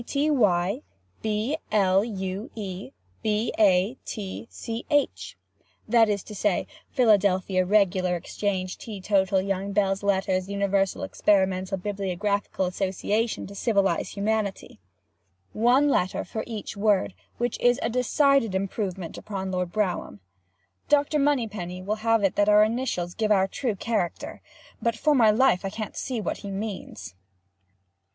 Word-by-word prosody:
T. - - -9
T. 290 +2 +2
Y. 200 -3 +2 0.4
B. 220 +7 -1
L. 195 -2 +3
U. 195 +1 -4
E. 190 - -6 0.3
B. 215 +2 0
A. 195 +2 +4
T. 205 +1 -6
C. 230 +1 -6
H.—that 240 -5 0
is 200 -2 -1
to 215 - -10
say, 205 -2 0 0.2
Philadelphia, 200 -6 +3
Regular, 185 -2 +2
Exchange, 185 +1 -3
Tea, 215 -3 -7
Total, 190 0 +2
Young, 195 0 -2
Belles, 195 -1 +1
Lettres, 190 -1 0
Universal, 200 -1 0
Experimental, 190 -1 +1
Bibliographical, 200 0 -2
Association, 200 +5 -1
To, 200 - -10
Civilize, 200 -3 0
Humanity—one 105 - -2
letter 190 -9 +1
for 220 - -4
each 220 -3 -6
word, 200 -2 +2 0.2
which 240 -1 -2
is 245 +1 +3
a 225 - +1
decided 250 -2 +2
improvement 190 -3 -3
upon 190 -2 -5
Lord 180 -1 -2
Brougham. 190 - -2 0.7
Dr. 295 +1 +3
Moneypenny 215 -11 -1
will 210 +3 -1
have 225 -1 +2
it 195 - +2
that 205 0 +4
our 210 0 +7
initials 215 -6 -1
give 215 +1 -1
our 195 -2 +4
true 230 +2 -2
character—but 220 +2 -4
for 300 +6 +2
my 235 -6 +5
life 215 -3 +3
I 195 - -2
can't 215 +1 -6
see 255 -4 -3
what 210 - -3
he 200 - -8
means. 195 - -6
200 Hz, 135 wpm, -26 LUFS, 190-225 Hz, 0.7 s, our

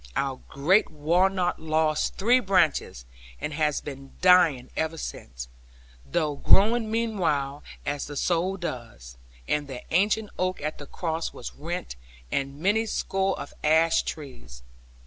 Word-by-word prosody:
Our 135 -2 -1
great 175 +10 +3
walnut 175 +4 +1
lost 155 -1 +1
three 240 +6 +4
branches, 170 - +1 0.3
and 150 - -4
has 150 -1 +1
been 135 -1 -9
dying 170 -9 +5
ever 160 +1 -1
since; - - -7 0.6
though 145 - -1
growing 220 +7 +4
meanwhile, 165 -12 0 0.2
as 145 0 -2
the 145 0 -7
soul 180 +5 +1
does. 115 - -7 0.3
And 150 -1 0
the 130 -3 -7
ancient 210 +4 +2
oak 185 0 0
at 155 +1 -4
the 145 - -9
cross 165 -1 -3
was 120 - -7
rent, 170 - -5 0.3
and 140 0 -2
many 210 +6 +2
score 195 -2 -1
of 140 - -7
ash 160 +2 +4
trees. 65 - -8
160 Hz, 135 wpm, -26 LUFS, 140-185 Hz, 0.6 s, dying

